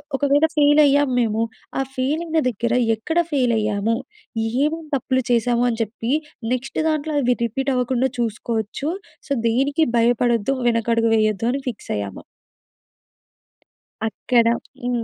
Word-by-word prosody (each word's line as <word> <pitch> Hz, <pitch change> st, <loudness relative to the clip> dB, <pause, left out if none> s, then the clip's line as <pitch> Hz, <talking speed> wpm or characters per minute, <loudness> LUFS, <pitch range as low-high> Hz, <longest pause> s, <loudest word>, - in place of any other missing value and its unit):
ఒకవేళ 285 Hz, +2 st, +3 dB
ఫెయిల్ 295 Hz, +1 st, +6 dB
అయ్యాము 285 Hz, -1 st, +3 dB
మేము. 220 Hz, -1 st, 0 dB, 0.4 s
ఆ -, -, +2 dB
ఫెయిల్ 275 Hz, +5 st, 0 dB
అయిన 325 Hz, -1 st, +1 dB
దగ్గర 235 Hz, +1 st, -2 dB, 0.2 s
ఎక్కడ 320 Hz, +10 st, -3 dB
ఫెయిల్ 255 Hz, -4 st, +2 dB
అయ్యాము? 210 Hz, +1 st, 0 dB, 0.7 s
ఏమేం 320 Hz, +2 st, -1 dB
తప్పులు 260 Hz, 0 st, 0 dB
చేశాము 240 Hz, +1 st, +2 dB
అని 230 Hz, -1 st, -3 dB
చెప్పి 225 Hz, +2 st, -5 dB, 0.4 s
నెక్స్ట్ 255 Hz, +1 st, -4 dB
దాంట్లో 310 Hz, 0 st, -1 dB
అవి 250 Hz, -1 st, +2 dB
రిపీట్ 270 Hz, +4 st, -1 dB
అవ్వకుండా 250 Hz, +1 st, +1 dB
చూసుకోవచ్చు. 225 Hz, +3 st, -2 dB, 0.4 s
సో 280 Hz, -, -12 dB, 0.2 s
దేనికి 275 Hz, +7 st, +2 dB
భయపడొద్దు 235 Hz, 0 st, +2 dB, 0.2 s
వెనకడుగు 230 Hz, 0 st, +2 dB
వేయొద్దు 215 Hz, 0 st, +1 dB
అని 275 Hz, -, -2 dB
ఫిక్స్ 230 Hz, -, -8 dB
అయ్యాము. 100 Hz, -2 st, -5 dB, 1.9 s
అక్కడ 235 Hz, +1 st, +1 dB, 0.4 s
హ్మ్. 245 Hz, -1 st, -1 dB
245 Hz, 130 wpm, -21 LUFS, 230-275 Hz, 1.9 s, ఫెయిల్